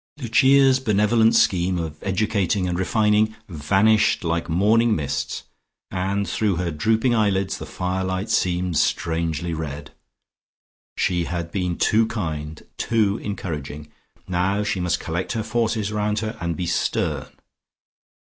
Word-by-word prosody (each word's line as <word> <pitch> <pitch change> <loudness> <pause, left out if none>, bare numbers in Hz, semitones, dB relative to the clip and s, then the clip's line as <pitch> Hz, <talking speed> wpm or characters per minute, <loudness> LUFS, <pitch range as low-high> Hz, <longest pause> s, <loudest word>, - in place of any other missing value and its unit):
Lucia's 135 +1 +4
benevolent 110 0 +3
scheme 95 -5 +2
of 80 -2 -5
educating 100 -1 0
and 90 0 -2
refining 105 +2 +2
vanished 100 +7 +2
like 85 0 -1
morning 110 +6 +3
mists, 75 -3 -3 0.5
and 95 +2 -1
through 100 +2 0
her 85 0 -2
drooping 110 - +1
eyelids, 100 -4 +1
the - - -7
firelight 95 +2 -2
seemed 90 -1 0
strangely 85 0 -1
red.... 75 -2 -6 1.1
She 85 -2 +1
had 85 -1 -4
been 90 -3 -2
too 110 +1 +3
kind, 80 -8 -5
too 110 -3 +1
encouraging: 75 -7 -6 0.4
now 95 +3 0
she 100 -2 -1
must 90 -1 0
collect 85 +6 -3
her 110 -2 -2
forces 110 -2 -1
round 105 0 -1
her 110 +2 -3
and 85 -2 -2
be 90 - -2
stern. - - -1
95 Hz, 130 wpm, -22 LUFS, 85-110 Hz, 1.1 s, Lucia's